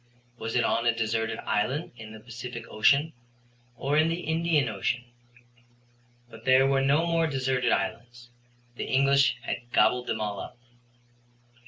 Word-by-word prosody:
Was 115 +1 -4
it 125 - +3
on 115 +1 +1
a 120 - +3
deserted 110 0 -1
island 135 +10 -1
in 110 -2 -10
the 110 - -10
Pacific 120 +1 -8
Ocean 140 +9 +2 0.6
or 140 +4 -1
in 160 +1 +3
the 170 +2 -2
Indian 160 -4 +1
Ocean? 115 +3 -2 1.2
But 115 -1 -14
there 130 +1 +5
were 135 0 +2
no 145 +5 +3
more 165 -1 +1
deserted 130 -3 0
islands: 120 +2 -3 0.5
the - - -3
English 140 +1 +3
had 120 0 -5
gobbled 125 +1 +3
them 110 - -2
all 105 -2 -3
up. - - -8
125 Hz, 150 wpm, -27 LUFS, 115-140 Hz, 1.2 s, there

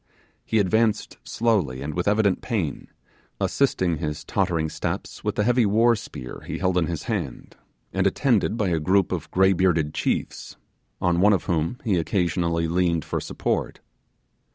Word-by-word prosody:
He 110 - 0
advanced 110 +2 +1
slowly 95 - 0
and 75 +2 -4
with 90 +3 -2
evident 105 -2 +2
pain, 95 - -3 0.5
assisting 85 -3 +1
his 75 0 -4
tottering 80 -2 0
steps - - -5
with - - -1
the 105 - +1
heavy 125 +2 +3
warspear 105 - 0
he - - -3
held 95 -1 0
in 80 - 0
his 85 -3 -4
hand, - - -4 0.4
and 95 0 +2
attended 115 0 +1
by 105 -5 0
a 85 -2 +1
group 95 +3 +2
of - - -3
grey 95 +1 +4
bearded 85 -5 +1
chiefs, - - -2 0.4
on 90 0 +1
one 105 +2 +6
of 95 - 0
whom 85 +6 -1
he 100 -6 +1
occasionally 85 -1 0
leaned 85 -2 +1
for - - -2
support. - - -2
90 Hz, 155 wpm, -24 LUFS, 85-105 Hz, 0.5 s, one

